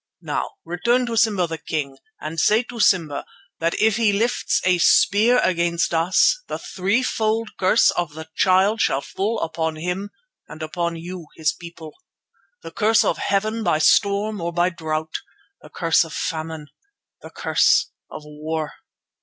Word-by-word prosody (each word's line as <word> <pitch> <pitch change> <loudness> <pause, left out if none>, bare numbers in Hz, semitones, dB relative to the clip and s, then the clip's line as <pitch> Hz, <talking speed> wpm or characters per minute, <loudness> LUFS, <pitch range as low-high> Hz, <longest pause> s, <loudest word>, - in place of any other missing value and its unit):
Now - - -3
return 240 +8 +1
to 235 -1 -3
Simba 215 -5 +2
the 165 -1 -6
King, 145 -3 -4 0.2
and 160 +2 -5
say 215 +8 +3
to 240 -1 -10
Simba 165 -9 +2 0.4
that 165 +1 -1
if 220 -1 +3
he 225 -3 +3
lifts 225 +4 0
a 180 -1 +3
spear 215 +8 +4
against 170 -1 0
us 180 - +3
the - - -4
threefold 220 +2 -1
curse 190 +4 +4
of 170 -4 -3
the 160 0 -8
Child 195 +4 +3
shall 135 - +1
fall 215 +8 -3
upon 160 -1 -2
him 180 +5 -4 0.4
and 155 - -9
upon 170 +1 -3
you 170 0 -8
his 155 -1 0
people: 170 -2 -11 0.7
The - - -8
curse 220 +1 +3
of - - 0
Heaven 215 +3 -1
by 155 - +2
storm 200 +5 +2
or 170 +1 -2
by 175 +1 +1
drought. 160 -2 -4 0.5
The - - -14
curse 165 -1 +2
of 165 - -10
famine. 160 -2 -4 0.5
The - - -10
curse - - +2 0.2
of 155 - -9
war. 155 0 -5
175 Hz, 155 wpm, -22 LUFS, 160-210 Hz, 0.7 s, spear